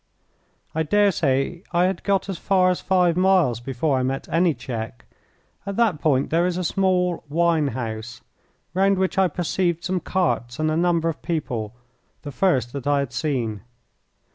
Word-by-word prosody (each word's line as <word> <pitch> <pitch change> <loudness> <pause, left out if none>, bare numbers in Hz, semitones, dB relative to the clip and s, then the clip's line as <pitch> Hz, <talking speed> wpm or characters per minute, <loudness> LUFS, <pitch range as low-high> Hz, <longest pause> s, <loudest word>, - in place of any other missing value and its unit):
I 160 - 0
dare 205 +6 +3
say 140 +1 0
I 175 0 +3
had 185 -1 -2
got 200 -1 +1
as 190 -4 -4
far 185 -2 +3
as 180 - -3
five 180 -3 +2
miles 180 - +3
before 135 +3 -1
I - - 0
met 135 +1 -2
any 165 -1 +2
check. 120 0 -6 0.6
At 200 -1 -5
that 215 -10 +1
point 140 -3 +1
there 170 +2 +3
is 180 -1 -2
a 185 - -2
small 180 -1 +1
wine 165 -1 +2
house, 115 -2 -5 0.5
round 195 +1 +3
which 190 0 0
I 190 - +5
perceived 175 0 -1
some 185 0 -1
carts 155 -11 -1
and 155 0 0
a - - 0
number 170 -1 +1
of 165 - -3
people, 125 -10 -3 0.5
the 145 - -6
first 130 -7 +1
that 140 -1 -5
I 145 0 +3
had 140 -3 -2
seen. 115 -5 -2
165 Hz, 175 wpm, -23 LUFS, 130-185 Hz, 0.6 s, I